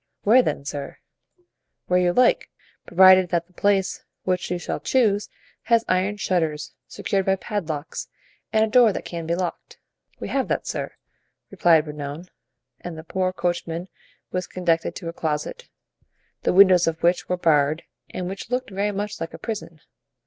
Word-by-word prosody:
"Where, 235 +5 +6
then, 140 - -3
sir?" 140 -1 -5 0.9
"Where 180 0 +2
you 180 -1 +3
like, 250 +7 +3 0.4
provided 185 0 +7
that 170 -1 0
the 180 - -30
place 195 0 +1 0.2
which 185 -1 -1
you 180 - -1
shall 175 - -4
choose 210 -6 +1 0.4
has 230 -1 +3
iron 190 +3 +1
shutters 160 -6 -1
secured 195 -1 -2
by 190 - +4
padlocks 170 -6 -4 0.4
and 220 0 +4
a - - -4
door 230 0 +5
that - - -5
can 170 -2 -5
be 170 - +1
locked." 180 -1 -5 0.4
"We - - -5
have 270 -1 0
that, - - -1
sir," - - -4 0.6
replied 165 -3 +4
Bernouin; 150 +3 -7 0.5
and 175 -2 -7
the 160 - -8
poor 185 +2 -1
coachman 175 -1 -3 0.4
was 180 0 -2
conducted 170 -2 0
to 175 - -7
a 165 - -4
closet, 170 - -3 0.7
the - - +1
windows 185 -2 +6
of 160 -1 -2
which 175 +1 +2
were 180 - 0
barred 155 -2 +2 0.3
and 180 - -4
which 195 +4 -6
looked 250 -3 -2
very 200 +2 -1
much 205 +1 -4
like 165 - -5
a - - -8
prison. 200 -8 -6
180 Hz, 165 wpm, -23 LUFS, 165-200 Hz, 0.9 s, provided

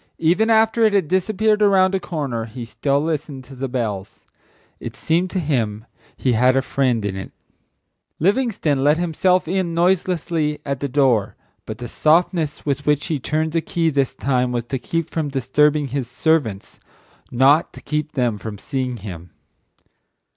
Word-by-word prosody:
Even 180 +8 +2
after 225 +1 +3
it 215 -2 +4
had 195 -6 +2
disappeared 210 +4 +1
around 195 -2 +4
a 195 - +1
corner, 140 -10 -3
he 120 +1 -8
still 140 +4 0
listened 150 -3 -3
to 135 - -14
the 135 +1 -3
bells. 110 -6 -4 0.6
It - - -7
seemed 175 +3 0
to 185 - -2
him 115 -9 -1 0.3
he 130 - +1
had 125 +3 +4
a 135 - +2
friend 125 -7 0
in 100 -2 -2
it. 95 - -7 0.9
Livingstone 190 - +1
let 150 +2 +4
himself 175 +1 +1
in 180 -1 -1
noiselessly 170 -3 +1
at 140 -1 -3
his 140 - -2
door, 125 -6 +2 0.3
but 110 - -5
the 120 - -6
softness 160 - +1
with 145 0 -2
which 150 -1 +2
he 155 -5 -2
turned 155 +4 -1
the 165 +1 0
key 165 0 0
this 140 -2 0
time 125 -2 0
was 120 -1 -1
to 130 +3 -4
keep 165 +5 -2
from 155 -3 -2
disturbing 140 +2 +1
his 130 -2 -3
servants, 125 -10 -1 0.5
not 135 +6 +3
to - - -11
keep 150 0 -3
them 120 -5 0
from 105 +1 -6
seeing 130 +2 -3
him. 90 -5 -9
145 Hz, 170 wpm, -21 LUFS, 125-170 Hz, 0.9 s, it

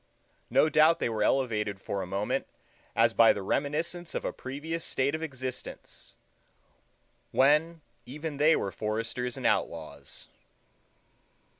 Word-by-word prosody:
No - - +4
doubt 155 +2 +5
they - - -1
were 110 -2 -2
elevated 105 -4 +1
for 100 0 -3
a - - -5
moment 100 +3 -1 0.5
as 115 0 +4
by 115 0 +6
the 100 - -5
reminiscence 160 - -2
of - - -2
a - - -2
previous 155 +5 -5
state 135 +2 0
of 160 - -3
existence, 130 -5 -7 1.1
when 155 +4 +3 0.3
even 150 +2 -5
they 155 +3 +5
were 100 - -2
foresters 115 +4 -3
and - - -6
outlaws. 75 -4 -2
130 Hz, 130 wpm, -29 LUFS, 105-155 Hz, 1.1 s, by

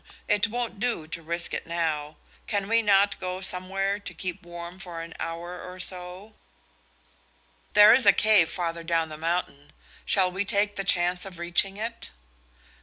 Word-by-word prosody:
It 210 +1 +2
won't 235 -2 -4
do 230 -8 -2
to 165 +1 -5
risk 170 +1 0
it - - -4
now. 155 -3 -2 0.3
Can 200 -2 -1
we 230 +1 +3
not 200 -1 +2
go 185 0 -4
somewhere 195 +2 -1
to 200 - -7
keep 185 0 -5
warm 175 +1 -10
for 170 -3 -7
an 165 0 -10
hour 170 +2 -6
or 180 0 -10
so?" 185 +3 -3 1.4
"There 210 +1 +8
is 255 +1 +5
a - - +10
cave 210 -6 +4
farther 170 -2 -2
down 165 -1 -1
the 155 - -8
mountain. 160 -3 -3 0.3
Shall 185 -2 +2
we 190 +2 -2
take 205 +1 +1
the 195 - -2
chance 180 -1 +4
of 190 -3 -6
reaching 175 +3 +1
it?" 230 +2 -5
180 Hz, 170 wpm, -26 LUFS, 170-200 Hz, 1.4 s, a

